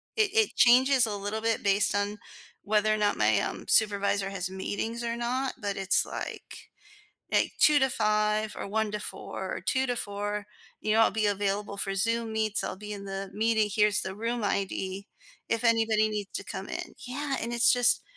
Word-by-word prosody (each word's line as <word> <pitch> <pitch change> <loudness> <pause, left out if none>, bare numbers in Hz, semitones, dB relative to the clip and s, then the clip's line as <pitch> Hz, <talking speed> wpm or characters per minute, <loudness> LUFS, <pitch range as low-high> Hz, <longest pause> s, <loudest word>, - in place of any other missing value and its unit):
It 425 -3 +2
it 440 -2 +2
changes 255 +1 +5
a 210 - -3
little 205 +2 -4
bit 225 -1 0
based 200 0 +2
on 205 +1 -1 0.5
whether 215 +1 +2
or - - 0
not 205 -1 +2
my, - - +3
um, - - -4
supervisor 200 -2 +2
has 190 -1 -3
meetings 220 +5 -4
or 235 0 -2
not, 250 +3 -1
but 200 -1 -2
it's 195 0 +1
like - - -7 0.6
like, - - +2
2:00 300 -1 +6
to 265 - +3
5:00 215 -1 +1
or - - -5
1:00 220 +1 0
to 210 - -3
4:00 - - -6
or - - -6
2:00 265 0 0
to 245 -1 -1
4:00. 205 -1 -3 0.3
"You 215 - 0
know, 225 - +4
I'll 225 - +5
be 215 +1 0
available 200 0 -1
for 195 0 -1
Zoom 230 +2 0
meets. 215 -1 0
I'll 185 - -4
be 210 +1 -8
in 200 -1 -7
the 195 0 -5
meeting. 220 0 +1
Here's 210 0 +3
the 190 - -5
room 230 +1 -2
ID 195 0 -2 0.4
if 230 +1 -1
anybody 225 -2 +3
needs 210 -2 -4
to - - -4
come - - -6
in." - - -6
Yeah. 275 +2 -3
And 235 - -3
it's 235 0 +5
just 245 -1 +3
215 Hz, 200 wpm, -28 LUFS, 205-230 Hz, 0.6 s, 2:00